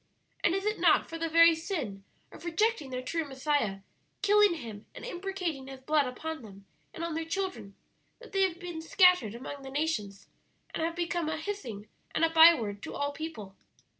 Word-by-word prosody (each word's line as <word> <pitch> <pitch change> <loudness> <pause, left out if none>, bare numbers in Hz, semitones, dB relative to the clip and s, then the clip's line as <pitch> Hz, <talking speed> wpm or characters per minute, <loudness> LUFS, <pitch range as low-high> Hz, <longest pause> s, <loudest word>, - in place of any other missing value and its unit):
"And 340 - +3
is 390 +1 -2
it 425 0 0
not - - +4
for 330 - -6
the 330 0 -1
very 335 +1 +7
sin 315 - -4 0.3
of - - -12
rejecting 345 -2 0
their 255 0 -4
true 330 +5 -1
Messiah, 270 -8 -1 0.4
killing 415 -2 +5
Him 225 -8 -8
and - - -8
imprecating 360 - -4
His 270 -1 -9
blood 295 0 +2
upon 315 +5 -5
them 200 -3 -13 0.3
and 335 - -7
on 335 -1 -2
their 325 +1 -2
children, 320 - -4 0.4
that 475 -2 -14
they 390 - +1
have 370 -3 +2
been 350 -3 -6
scattered 360 - +4
among 275 +3 -7
the 270 - -8
nations 265 -9 -2 0.5
and - - -3
have 330 +1 -1
become 345 -2 -1
a 315 - -2
hissing 280 - -5 0.3
and 330 - +4
a 325 - -1
byword 320 -12 +6
to - - -7
all 285 0 -1
people?" 285 -11 -7
320 Hz, 190 wpm, -30 LUFS, 255-350 Hz, 0.5 s, very